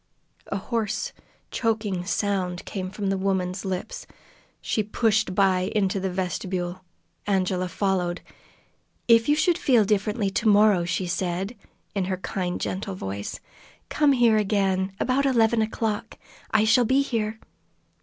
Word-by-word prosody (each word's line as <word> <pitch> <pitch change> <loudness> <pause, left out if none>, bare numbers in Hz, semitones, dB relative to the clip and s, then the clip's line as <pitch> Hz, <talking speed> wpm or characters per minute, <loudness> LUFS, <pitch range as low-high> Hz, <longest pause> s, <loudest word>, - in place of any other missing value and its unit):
A - - -2
hoarse, 215 0 -2 0.4
choking 215 -6 -1
sound 185 -3 -1
came 185 -2 -4
from 200 0 -2
the 195 - -1
woman's 190 -1 -1
lips. 190 - -4 0.5
She 215 - -1
pushed 215 -2 +1
by 190 -1 +2
into 195 -2 +1
the 190 0 -1
vestibule. 180 0 -3 0.4
Angela 185 -2 +1
followed. 180 -2 -1 0.9
"If 230 +2 +5
you 295 - +5
should 345 +3 +2
feel 245 - +4
differently 210 0 0
to 200 +3 0
morrow," 205 -4 +5
she 180 +2 -1
said, 180 +4 -2 0.4
in 195 -2 0
her 185 0 -2
kind, 180 -1 -3
gentle 195 +1 -3
voice, 100 - -5 0.5
"come 295 -2 +3
here 235 -4 +4
again, 195 -2 +1
about 270 +2 +2
eleven 230 -3 +3
o'clock. 220 0 -2 0.3
I 220 -1 +3
shall 240 +2 +4
be 265 +4 +3
here." 220 -4 -2
200 Hz, 135 wpm, -25 LUFS, 185-220 Hz, 0.9 s, If